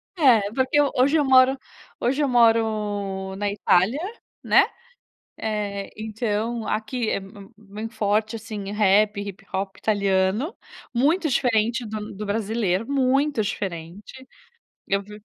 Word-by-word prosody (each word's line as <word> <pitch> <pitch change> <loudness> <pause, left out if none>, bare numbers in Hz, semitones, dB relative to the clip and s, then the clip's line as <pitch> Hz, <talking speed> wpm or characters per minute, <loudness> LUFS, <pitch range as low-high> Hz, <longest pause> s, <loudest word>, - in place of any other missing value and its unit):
É, 260 - +5
porque 260 +3 +2
eu 290 -1 +3
hoje 275 +5 +3
eu 295 - +2
moro 260 0 +5 0.4
hoje 270 +5 0
eu - - +2
moro 210 -5 +1
na 205 +1 -1
Itália, 200 +4 +2 0.4
né. - - +5 0.7
Eh, 205 -2 -3
então 220 +1 -2
aqui 225 +2 -2
é - - +1
m 195 0 -7
m 195 0 -12
muito 215 +2 -8
forte, 215 +1 0
assim, 215 -3 -6
rap, 210 0 +3
hip-hop 195 -1 -5
italiano. 200 - +1 0.4
Muito 310 +7 +2
diferente 235 -2 +1
do 215 0 -6
do 210 +2 -5
brasileiro, 210 -1 -1
muito 275 -1 +2
diferente. 195 +5 -6 0.6
Eu 195 0 0
vi 210 +1 -12
215 Hz, 130 wpm, -24 LUFS, 200-245 Hz, 0.7 s, É